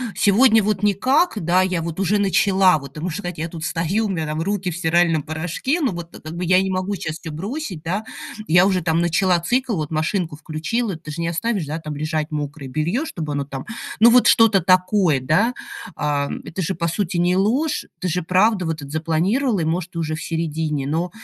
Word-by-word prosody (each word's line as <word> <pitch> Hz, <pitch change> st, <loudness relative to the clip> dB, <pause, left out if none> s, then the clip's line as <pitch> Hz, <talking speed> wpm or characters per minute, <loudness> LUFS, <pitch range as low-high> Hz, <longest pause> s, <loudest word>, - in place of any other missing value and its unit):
сегодня 220 Hz, +2 st, +5 dB
вот 205 Hz, -1 st, -1 dB
никак, 225 Hz, -, +2 dB
да, 180 Hz, +3 st, +3 dB
я 185 Hz, -2 st, -1 dB
вот 165 Hz, +1 st, -5 dB
уже 195 Hz, +2 st, +2 dB
начала, 190 Hz, -2 st, +4 dB
вот". 140 Hz, -2 st, -10 dB
Ты 150 Hz, -, -8 dB
можешь 175 Hz, 0 st, -3 dB
сказать: 175 Hz, -5 st, -6 dB
"Я 165 Hz, +2 st, -3 dB
тут 160 Hz, -1 st, -6 dB
стою, 180 Hz, +6 st, 0 dB
у -, -, -2 dB
меня 165 Hz, -5 st, -2 dB
там 155 Hz, +1 st, -3 dB
руки 195 Hz, +1 st, -1 dB
в 170 Hz, -, -5 dB
стиральном 170 Hz, -2 st, +2 dB
порошке, 170 Hz, -, -2 dB
но 270 Hz, -7 st, +1 dB
вот-то 175 Hz, -1 st, -8 dB
так, -, -, -26 dB
как 155 Hz, +2 st, -7 dB
бы, 180 Hz, -, -2 dB
и -, -, -4 dB
я 185 Hz, +1 st, +5 dB
не 190 Hz, -, -1 dB
могу 185 Hz, +2 st, -1 dB
сейчас 160 Hz, -5 st, -4 dB
всё 165 Hz, -, -7 dB
бросить, 195 Hz, -, -5 dB
да, 185 Hz, +6 st, -2 dB, 0.4 s
я 175 Hz, +3 st, +5 dB
уже 185 Hz, -2 st, +1 dB
там 165 Hz, 0 st, +1 dB
начала 175 Hz, +1 st, +2 dB
цикл, 245 Hz, +6 st, 0 dB
вот 155 Hz, -4 st, -3 dB
машинку 160 Hz, +1 st, -1 dB
включила". 165 Hz, +8 st, -3 dB
Ты 155 Hz, -, -12 dB
же 160 Hz, +3 st, -5 dB
не 165 Hz, -, -1 dB
оставишь 195 Hz, +1 st, -1 dB, 0.2 s
там 150 Hz, -1 st, -5 dB
лежать 155 Hz, +1 st, -2 dB
мокрое 145 Hz, -2 st, -5 dB
белье, 170 Hz, -, -1 dB
чтобы 160 Hz, -, -5 dB
оно 145 Hz, 0 st, -1 dB
там, 135 Hz, -1 st, -7 dB, 0.3 s
ну, 235 Hz, +2 st, +7 dB
вот 250 Hz, +1 st, +6 dB
что-то 225 Hz, -4 st, +5 dB
такое, 185 Hz, -3 st, +3 dB
да? 160 Hz, -, +2 dB, 0.4 s
А, 145 Hz, -1 st, -1 dB
это 185 Hz, -, -5 dB
же, 185 Hz, +2 st, -2 dB
по 170 Hz, 0 st, -1 dB
сути, 175 Hz, +1 st, -2 dB
не 175 Hz, +1 st, +2 dB
ложь, 255 Hz, +11 st, +1 dB
ты 185 Hz, -, -2 dB
же 180 Hz, +1 st, 0 dB
правда 185 Hz, +3 st, +2 dB
вот 160 Hz, -, -1 dB
этот 145 Hz, -2 st, -10 dB
запланировала 175 Hz, -, 0 dB
и, -, -, 0 dB
может, 175 Hz, +2 st, -2 dB
уже 160 Hz, -2 st, -2 dB
в 160 Hz, -, -7 dB
середине, 160 Hz, -3 st, -2 dB
но 165 Hz, +5 st, -1 dB
175 Hz, 220 wpm, -21 LUFS, 160-200 Hz, 0.4 s, ну